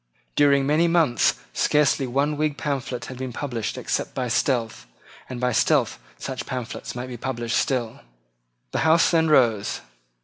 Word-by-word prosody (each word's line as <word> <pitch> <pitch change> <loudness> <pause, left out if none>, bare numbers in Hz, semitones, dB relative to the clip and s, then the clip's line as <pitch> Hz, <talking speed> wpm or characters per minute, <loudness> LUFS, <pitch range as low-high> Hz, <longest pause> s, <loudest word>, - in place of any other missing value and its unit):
During 140 -1 +4
many 155 +4 +3
months 165 -8 +3 0.2
scarcely 145 -2 +2
one 140 +4 0
Whig 150 -1 -1
pamphlet 130 -4 -3
had 130 0 -9
been 130 -1 -4
published 120 -4 -4
except - - -3
by 125 -2 -2
stealth; 115 -1 0 0.4
and 125 -1 -5
by 125 0 +1
stealth 105 - +2 0.2
such 130 - -5
pamphlets 125 -3 -5
might 125 0 -4
be 125 -1 -7
published 120 -2 -2
still. 120 -4 -1 0.7
The - - -1
Houses 160 +1 +4
then 160 -2 +3
rose. 115 -8 +2
130 Hz, 150 wpm, -24 LUFS, 120-145 Hz, 0.7 s, During